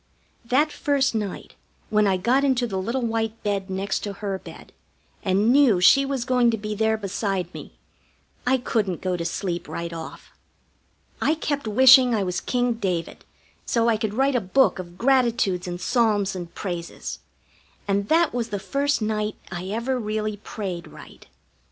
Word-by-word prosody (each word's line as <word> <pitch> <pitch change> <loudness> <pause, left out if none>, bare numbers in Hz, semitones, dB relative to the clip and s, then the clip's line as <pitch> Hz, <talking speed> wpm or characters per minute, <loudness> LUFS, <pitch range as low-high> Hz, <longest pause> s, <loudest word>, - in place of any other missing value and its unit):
That 275 +6 +2
first 280 -3 +1
night 210 -4 -4 0.4
when 210 -1 +3
I 190 -1 +2
got 245 +8 +2
into 260 -3 +2
the 195 -5 -3
little 235 +6 -2
white 225 -1 -2
bed 200 -2 -2
next 190 +1 -2
to 205 - -5
her 195 -1 -4
bed, - - -12 0.5
and 200 +4 +2
knew 265 -9 +5
she 275 +9 +6
was 270 -3 -2
going 250 -2 +3
to 225 - 0
be 210 0 -4
there 220 +1 +1
beside 195 -3 -3
me, - - -10 0.7
I 260 +1 +4
couldn't 210 -7 -1
go 185 -1 -1
to 170 - -3
sleep 175 +1 -3
right 170 0 -5
off. 165 - -9 0.9
I 310 - +2
kept 285 -5 -3
wishing 255 +2 +7
I 205 - 0
was 180 -2 -2
King 245 -1 0
David, 185 -7 -3 0.4
so 235 0 +1
I 225 - +2
could 215 -1 -3
write 270 +2 +2
a 245 - +2
book 200 +4 +2
of 175 -1 -9
gratitudes 235 -8 +2
and 175 0 -4
psalms 210 -3 +1
and 175 -2 -6
praises, 175 -3 -5 0.7
and 200 0 0
that 330 0 +3
was 240 -1 -2
the 205 - -2
first 275 +6 -1
night 215 0 -1 0.2
I 180 +1 -5
ever 235 +5 -1
really 215 -1 -2
prayed 190 -4 -6
right. - - -14
215 Hz, 170 wpm, -24 LUFS, 190-245 Hz, 0.9 s, wishing